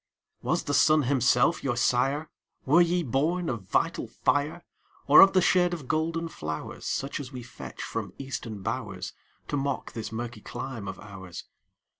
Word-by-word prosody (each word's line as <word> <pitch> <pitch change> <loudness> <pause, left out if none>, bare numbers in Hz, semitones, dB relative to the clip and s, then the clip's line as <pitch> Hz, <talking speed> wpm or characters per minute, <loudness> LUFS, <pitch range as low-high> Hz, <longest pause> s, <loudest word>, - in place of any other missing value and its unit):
Was - - 0
the 145 - -2
sun 155 +2 +5
himself 130 +3 +3
your 120 -3 0
sire? 135 +5 +2 0.4
Were 155 +6 +6
ye 175 0 +2
born 160 +6 0
of 115 -4 -3
vital - - +1
fire? 145 +5 0 0.4
Or 145 - +9
of 195 - +8
the 185 -2 +4
shade 180 -1 +3
of 145 -6 -10
golden 165 +2 0
flowers, 80 - -6
Such 135 +2 -2
as 140 -2 -7
we 125 -2 -7
fetch 120 - -9
from - - -4
Eastern 115 -7 -6
bowers, - - -4 0.4
To 145 - 0
mock 140 -1 -2
this 115 -2 -5
murky 115 -1 -5
clime 120 -4 -6
of 95 - -6
ours? 95 -4 -9
135 Hz, 165 wpm, -27 LUFS, 120-160 Hz, 0.4 s, Or